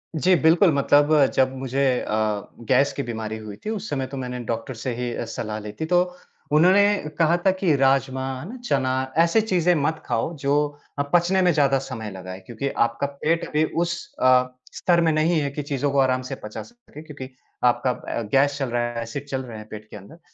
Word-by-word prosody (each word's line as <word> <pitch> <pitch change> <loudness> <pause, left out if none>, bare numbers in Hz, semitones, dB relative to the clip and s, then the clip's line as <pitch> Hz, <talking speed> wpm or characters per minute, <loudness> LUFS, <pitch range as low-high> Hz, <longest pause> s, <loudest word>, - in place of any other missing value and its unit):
जी, 180 +4 +4
बिल्कुल। 165 +4 +4
मतलब 145 +1 +4
जब 130 0 +2
मुझे 135 +1 -1 0.2
अ, 105 -1 -1 0.2
गैस 135 +2 +3
की 140 - -3
बीमारी 110 -2 -4
हुई 105 -2 -8
थी, - - -2
उस 215 -1 -4
समय 135 -3 -2
तो 135 +1 -7
मैंने 125 -1 -4
डॉक्टर 115 +4 -4
से 125 - -2
ही 120 0 -3
सलाह 110 -1 -4
ली 105 0 -7
थी। - - +1
तो 175 +2 +3 0.5
उन्होंने 180 +7 +5 0.3
कहा 170 +1 +3
था 190 - +6
कि 185 -5 +1
राजमा, 135 -1 +1
है 150 - -8
ना? 255 - -7
चना, 130 - 0
ऐसी 170 +6 +4
चीज़ें 180 -4 +2
मत 155 +1 -1
खाओ 120 +7 -1
जो 140 +1 0 0.4
अ, - - +1
पचने 175 +2 +3
में 180 - +4
ज़्यादा 140 -3 +3
समय 110 -6 -6
लगाए 95 0 -8
क्योंकि 120 +6 -4 0.2
आपका 120 +4 -3
पेट 150 +4 -1
अभी 150 +1 +1 0.2
उस 170 +11 -5
अ, 125 0 +5 0.3
स्तर 170 -1 +2
में 165 -1 +3
नहीं 155 +2 +2
है 140 - -1
कि 145 +2 -4
चीज़ों 140 0 -1
को 140 - +2
आराम 130 -1 +2
से 135 - -3
पचा 105 - -6
सके। 240 -11 -15
क्योंकि 145 -4 -9 0.3
आपका 125 +1 +3
अ, 120 - -4
गैस 140 +1 +3
चल 135 -3 -2
रहा 120 0 0
है, 115 - -4
एसिड 115 +5 -6
चल 130 -1 -2
रहे 115 -3 -8
हैं 105 0 -10
पेट 110 0 -9
के - - -9
अंदर 105 - -14
140 Hz, 210 wpm, -23 LUFS, 125-160 Hz, 0.5 s, था